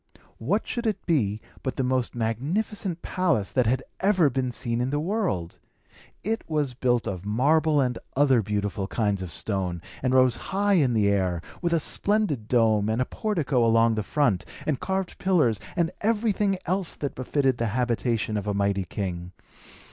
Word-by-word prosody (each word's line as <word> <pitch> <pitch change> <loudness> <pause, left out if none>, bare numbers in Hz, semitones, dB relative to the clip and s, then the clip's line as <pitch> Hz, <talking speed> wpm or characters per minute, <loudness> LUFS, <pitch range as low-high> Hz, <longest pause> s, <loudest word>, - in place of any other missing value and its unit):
What 185 - 0
should 235 -1 -2
it 205 -3 -2
be 110 - +1 0.2
but 130 - -3
the 135 - -1
most 130 -1 0
magnificent 165 - -2
palace 165 - 0
that 125 -4 +2
had 130 +3 +1 0.2
ever 185 -7 +3
been 130 0 -1
seen 120 -1 -2
in 125 - 0
the 145 +2 0
world? 165 - -2 0.6
It 225 +2 -1
was 150 -5 0
built 120 -1 +1
of 95 -2 -4
marble 150 +8 +2
and 125 -3 0 0.2
other 135 -4 +4
beautiful 105 -1 -2
kinds 105 -4 0
of 90 -3 -6
stone, 90 0 -2 0.2
and 130 0 +1
rose 130 -2 +5
high 200 +1 +2
into 135 -10 +3
the 105 -2 +3
air, 95 -4 +1 0.2
with 170 -1 0
a 165 - +3
splendid 180 - +1
dome 110 -4 +3
and 110 +2 0
a 125 - +2
portico 155 - 0
along 115 0 +4
the 110 - -1
front, 105 -5 +1 0.2
and 150 -4 0
carved 190 -1 -3
pillars, 155 - +2 0.2
and 170 -2 +1
everything 210 -2 +1
else 185 0 -1
that 140 - -4
befitted 130 -1 0
the 115 - +1
habitation 115 -1 0
of 105 0 -4
a 100 - 0
mighty 100 -1 0
king. 90 -1 -5
125 Hz, 175 wpm, -26 LUFS, 110-170 Hz, 0.6 s, rose